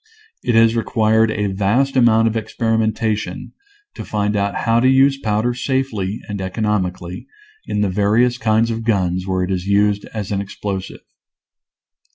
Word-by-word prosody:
It 120 -3 0
has 115 0 +5
required 110 -1 +2
a 105 -1 -1
vast 120 +8 +1
amount 115 -3 +4
of 115 - -1
experimentation 110 -1 -2 0.4
to - - -7
find 105 0 -1
out 100 0 -1
how 115 0 +3
to 130 +2 +3
use 135 +1 +4
powder 110 +1 0
safely 120 -6 -2
and 100 -2 -5
economically 95 -3 -3 0.4
in 105 - -1
the 105 - +1
various 110 +6 +2
kinds 110 +1 +2
of 115 0 -4
guns 95 -4 0
where 95 -1 0
it 90 - -3
is 90 0 -2
used 100 0 +2
as 105 -3 -6
an 100 -1 -1
explosive. 100 -1 -6
110 Hz, 155 wpm, -19 LUFS, 100-115 Hz, 0.4 s, has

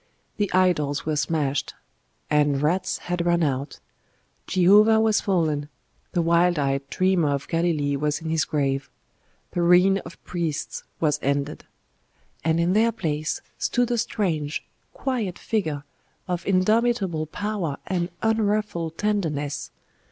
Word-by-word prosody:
The 205 -2 0
idols 165 -5 +2
were 155 -1 0
smashed, 150 -2 -1 0.5
and 145 -2 +2
rats 180 +5 +1
had 175 -1 -1
run 170 0 +2
out; 140 -1 -2 0.7
Jehovah 205 +4 +5
was 220 -1 +3
fallen; 155 -6 0 0.4
the 175 - +2
wild 170 +1 +3
eyed 140 -1 -1
dreamer 185 -4 +2
of 140 - -6
Galilee 160 -4 0
was 150 +1 -1
in 160 0 -4
his 160 -2 +2
grave; 135 -2 -1 0.6
the 175 - -1
reign 180 +3 +5
of 165 -2 -11
priests 165 -4 -3 0.2
was 150 -3 +1
ended. 140 +2 -1 0.8
And 160 0 +2
in 170 +2 +2
their 225 +3 +4
place 155 -7 -2 0.2
stood 245 0 +1
a 240 - +1
strange, 165 -10 -1 0.3
quiet 230 -9 -2
figure 155 -10 -2 0.4
of 175 -1 -3
indomitable 195 -4 +2
power 190 -5 -3
and 175 -2 -1
unruffled 210 -7 0
tenderness.... 160 -9 -1
170 Hz, 130 wpm, -24 LUFS, 150-195 Hz, 0.8 s, Jehovah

